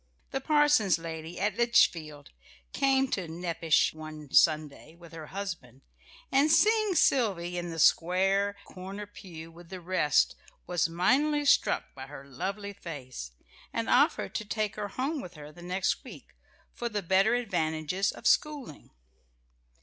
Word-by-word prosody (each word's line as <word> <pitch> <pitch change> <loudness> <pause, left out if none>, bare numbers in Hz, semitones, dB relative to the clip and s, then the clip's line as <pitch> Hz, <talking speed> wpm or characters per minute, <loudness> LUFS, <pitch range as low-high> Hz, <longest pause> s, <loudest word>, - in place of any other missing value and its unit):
The 270 - -2
parson's 295 - +3
lady 165 +1 -7
at 205 +1 -1
Litchfield 160 -11 +2 0.4
came 270 -1 +2
to 185 -7 -2
Nepash 165 -1 +1
one 155 -2 -10
Sunday, 155 0 +2
with 170 -1 -15
her 160 -2 -8
husband, 165 - -7 0.5
and 280 +3 +4
seeing 425 +3 +4
Sylvy 195 - +2
in 175 0 -3
the 165 - -6
square 195 +5 +3
corner 195 +3 -8
pew 170 -5 -11
with 170 0 -15
the 185 -1 -7
rest, 165 -5 +2 0.3
was 175 -2 0
mightily 285 - +2
struck 280 - +2
by 130 0 -9
her 140 -1 -10
lovely 200 +9 -5
face, 130 - -8 0.4
and - - -2
offered 100 - +2
to - - -2
take 215 0 -2
her 210 -1 -4
home 270 +8 -3
with 180 -5 -10
her 150 0 -10
the 175 - -15
next 185 +2 -1
week, - - -13 0.4
for 240 - -4
the 210 -2 -3
better 195 +6 +3
advantages 180 -4 -1
of - - -13
schooling. 285 - 0
180 Hz, 145 wpm, -29 LUFS, 160-215 Hz, 0.5 s, and